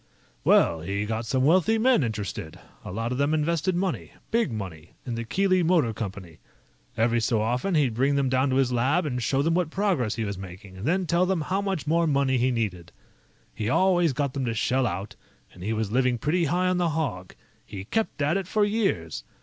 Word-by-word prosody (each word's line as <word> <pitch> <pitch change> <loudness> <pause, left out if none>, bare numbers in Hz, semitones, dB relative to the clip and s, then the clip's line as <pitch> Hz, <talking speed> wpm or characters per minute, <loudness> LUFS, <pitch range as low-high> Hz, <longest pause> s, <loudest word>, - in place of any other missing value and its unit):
"Well, 85 - +4
he 100 +5 -2
got 110 +1 -3
some 130 +3 +1
wealthy 185 +8 +4
men 250 -1 +4
interested. 105 -8 -4 0.2
A - - -7
lot 115 +4 -3
of 125 - -2
them 145 +2 +2
invested 170 +3 0
money 185 0 -2 0.2
big 230 - +1
money 90 -7 -7
in 125 - -4
the 115 0 -3
Keely 185 - +2
Motor 165 -9 +2
Company. 95 -6 -7 0.6
Every 115 +1 +2
so 110 0 +1
often, 125 - 0
he'd 140 -6 +2
bring 135 +5 +1
them 140 -1 +1
down 130 +2 +2
to 130 - 0
his 130 -2 +2
lab 135 +9 +2
and 125 -4 -2
show 135 +4 +1
them 165 +2 +1
what 175 -2 +1
progress 170 - 0
he 115 - -2
was 100 -2 -4
making 95 +1 -10
and 100 +8 -5
then 185 +3 +1
tell 175 +2 +2
them 190 -3 0
how 190 +6 -1
much 195 -5 -2
more 165 +2 +2
money 140 -3 +2
he 125 +2 +2
needed. 105 -8 -3 0.6
He 105 0 -3
always 175 +1 +3
got 140 0 -2
them 135 -2 -2
to 115 -1 -2
shell 130 +3 +1
out, 95 +1 -5 0.4
and 90 - -14
he 105 +4 -2
was 110 -2 -2
living 125 0 +2
pretty 160 +8 +1
high 180 +5 +1
on 185 0 +1
the 175 -1 +2
hog. 140 - -3 0.3
He 95 -1 -8
kept 215 - -1
at 150 +6 +2
it 195 -3 -4
for 210 +2 +2
years. 200 - -1
130 Hz, 215 wpm, -26 LUFS, 110-170 Hz, 0.6 s, Well